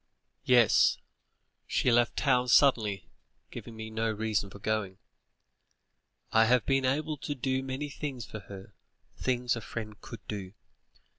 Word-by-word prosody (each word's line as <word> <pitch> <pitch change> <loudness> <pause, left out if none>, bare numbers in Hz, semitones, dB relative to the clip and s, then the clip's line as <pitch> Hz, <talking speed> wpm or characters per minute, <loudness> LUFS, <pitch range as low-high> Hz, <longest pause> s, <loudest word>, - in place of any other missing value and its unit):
"Yes, 120 -4 +5 0.7
she 125 - +2
left 120 0 +2
town 125 -3 +2
suddenly, 110 -8 +3 0.4
giving 115 - -9
me 110 0 -7
no 110 +1 -1
reason 110 -2 -1
for 100 - -11
going. 100 -2 -2 1.3
I 110 0 +5
have 125 +1 +3
been 135 -1 +2
able 150 +4 0
to 145 +2 -4
do 130 0 -1
many 135 +2 -4
things 135 -5 -5
for 110 - -8
her; 100 -1 -11 0.4
things 125 -1 0
a 115 - -5
friend 110 -1 -7
could 115 - -11
do. 100 -3 -6
115 Hz, 140 wpm, -29 LUFS, 110-130 Hz, 1.3 s, Yes